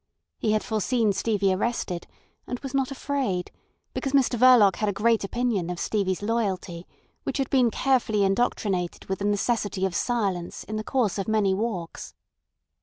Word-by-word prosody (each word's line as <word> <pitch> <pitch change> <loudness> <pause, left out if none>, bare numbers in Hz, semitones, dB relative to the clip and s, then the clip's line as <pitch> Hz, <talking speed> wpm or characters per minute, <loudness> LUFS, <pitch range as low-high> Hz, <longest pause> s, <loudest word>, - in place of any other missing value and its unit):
He 215 - +1
had 215 - +1
foreseen 220 -1 +1
Stevie 200 -2 +1
arrested, 185 -4 -2 0.4
and 250 - -3
was 270 -1 -6
not 270 -2 +1
afraid, 265 -10 -2 0.4
because 270 -2 -3
Mr 265 -3 +3
Verloc 240 -5 +6
had 215 - 0
a - - -1
great 225 +2 +2
opinion 210 -4 -1
of 175 -1 -4
Stevie's 195 -2 -1
loyalty, 195 -6 -2 0.3
which - - -3
had 270 -2 -2
been 255 -3 +4
carefully 230 -5 +1
indoctrinated 195 -3 0
with 190 - -3
the 200 - -2
necessity 205 -2 0
of 190 - -2
silence 195 -5 -1
in 215 - -6
the 215 - -2
course 220 -5 0
of 195 - -3
many 215 -3 +2
walks. 190 -5 -4
215 Hz, 165 wpm, -26 LUFS, 190-240 Hz, 0.4 s, Verloc